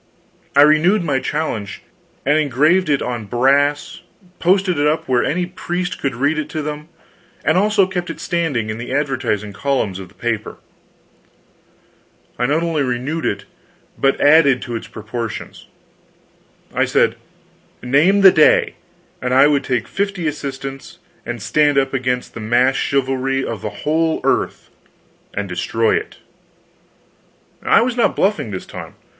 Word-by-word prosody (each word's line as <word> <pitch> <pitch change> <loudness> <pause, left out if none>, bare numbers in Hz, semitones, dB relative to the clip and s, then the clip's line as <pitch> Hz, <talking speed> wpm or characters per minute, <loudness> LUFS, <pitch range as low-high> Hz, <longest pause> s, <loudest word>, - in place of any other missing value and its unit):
I 140 - +8
renewed 165 +7 +4
my 140 -5 0
challenge, 125 -10 -4 0.4
engraved 150 +4 +2
it 140 -2 +1
on 120 -3 -4
brass, 140 +6 +1 0.4
posted 185 -2 +2
it 145 - +3
up 155 +2 0
where 125 -2 +2
any 180 +4 0
priest 180 0 -4
could 135 -3 -1
read 145 +5 +1
it 150 - -4
to 155 - -4
them, 150 +1 -6 0.6
and - - +3
also 200 +1 +3
kept 180 -1 -4
it - - -6
standing 155 - -1
in 110 - -6
the 120 - -6
advertising 130 -7 -1
columns 110 -6 -1
of 95 - -8
the - - -23
paper. 115 -3 -3 1.8
I 125 - +1
not 155 +4 +1
only 165 -3 0
renewed 135 +5 -2
it, 100 0 -3 0.5
but 135 0 +1
added 145 -3 +5
to 120 - -5
its 115 - -6
proportions. 110 0 -7 1.1
I - - +2
said, - - +2 0.7
name 155 +11 +3
the 190 -1 +9
day, 155 -4 +4 0.4
and 125 0 0
I 135 +2 +7
would 145 -2 +2
take 125 -3 -1
fifty 195 -3 -2
assistants 135 -2 -5 0.3
and 120 -4 -5
stand 150 -2 +2
up 135 0 +1
against 125 -1 -2
the - - -7
massed 120 +4 +2
chivalry 135 -1 0
of 110 -4 -5
the 105 - -3 0.2
whole 160 +1 +1
earth - - -1 0.6
and 100 0 -4
destroy 105 +5 0
it. - - -4 1.4
I - - +4
was 240 +1 0
not 240 - +2
bluffing 200 - 0
this 95 -3 -6
time. - - -9
140 Hz, 150 wpm, -19 LUFS, 125-160 Hz, 1.8 s, the